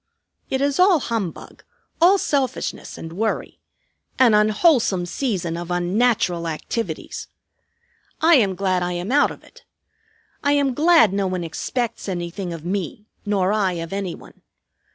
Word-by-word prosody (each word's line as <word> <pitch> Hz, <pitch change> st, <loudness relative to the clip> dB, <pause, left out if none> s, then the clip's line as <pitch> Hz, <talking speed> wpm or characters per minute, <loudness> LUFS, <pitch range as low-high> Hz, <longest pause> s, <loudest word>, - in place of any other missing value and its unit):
It 265 Hz, -, -1 dB
is 280 Hz, +2 st, 0 dB
all 365 Hz, -3 st, +5 dB
humbug, 225 Hz, -, -5 dB, 0.4 s
all 370 Hz, +4 st, +6 dB
selfishness, 275 Hz, -, -2 dB
and 165 Hz, 0 st, -8 dB
worry; 220 Hz, +5 st, -2 dB, 0.6 s
an 250 Hz, -4 st, +5 dB
unwholesome 210 Hz, -, +3 dB
season 180 Hz, -4 st, -2 dB
of 170 Hz, 0 st, -6 dB
unnatural 180 Hz, -1 st, +1 dB
activities. 165 Hz, +8 st, -4 dB, 0.9 s
I 330 Hz, +2 st, +5 dB
am 205 Hz, -, +4 dB
glad 185 Hz, -1 st, 0 dB
I 175 Hz, 0 st, -1 dB
am 175 Hz, +5 st, -4 dB
out 290 Hz, +2 st, +4 dB
of -, -, -11 dB
it. -, -, -19 dB, 0.8 s
I 285 Hz, -, +3 dB
am 280 Hz, -2 st, +2 dB
glad 310 Hz, -, +5 dB
no 200 Hz, -1 st, 0 dB
one 185 Hz, -1 st, -2 dB
expects 225 Hz, +7 st, -3 dB
anything 175 Hz, +1 st, -4 dB
of 165 Hz, -1 st, -7 dB
me, 195 Hz, +2 st, -3 dB, 0.2 s
nor 200 Hz, -1 st, +1 dB
I 200 Hz, -4 st, +1 dB
of 165 Hz, +1 st, -5 dB
any 195 Hz, -3 st, -3 dB
one. -, -, -16 dB
200 Hz, 145 wpm, -22 LUFS, 175-260 Hz, 0.9 s, all